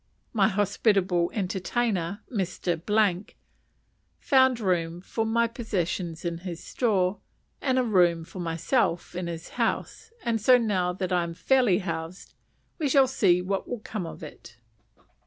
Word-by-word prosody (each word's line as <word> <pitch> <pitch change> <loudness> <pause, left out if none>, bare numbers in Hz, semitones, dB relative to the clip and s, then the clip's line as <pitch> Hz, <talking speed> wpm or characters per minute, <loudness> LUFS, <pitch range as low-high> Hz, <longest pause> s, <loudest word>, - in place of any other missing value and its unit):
My 205 -4 +4
hospitable 195 -3 +1
entertainer, 195 0 -2
Mr., 190 +1 0 0.9
found 260 -3 +4
room 175 -4 0
for 220 +4 -3
my 235 +1 +2
possessions 185 -7 -3
in 170 -1 -2
his 175 -2 -7
store, 195 -5 0 0.4
and 260 -2 +1
a 255 - +3
room 175 -7 +3
for 185 - -10
myself 170 +3 0
in 180 -1 -4
his 165 -1 -6
house; - - -2
and 225 -2 0
so 250 +4 +6
now 195 -6 0
that 185 0 -3
I 180 - +3
am 170 -1 -4
fairly 220 +2 +3
housed 180 -2 -5 0.5
we 300 -3 0
shall 270 0 +6
see 180 -8 +2
what 195 +1 -2
will 245 -3 -4
come 210 -5 -5
of 165 - -9
it. 120 -6 -11
190 Hz, 140 wpm, -26 LUFS, 175-225 Hz, 0.9 s, so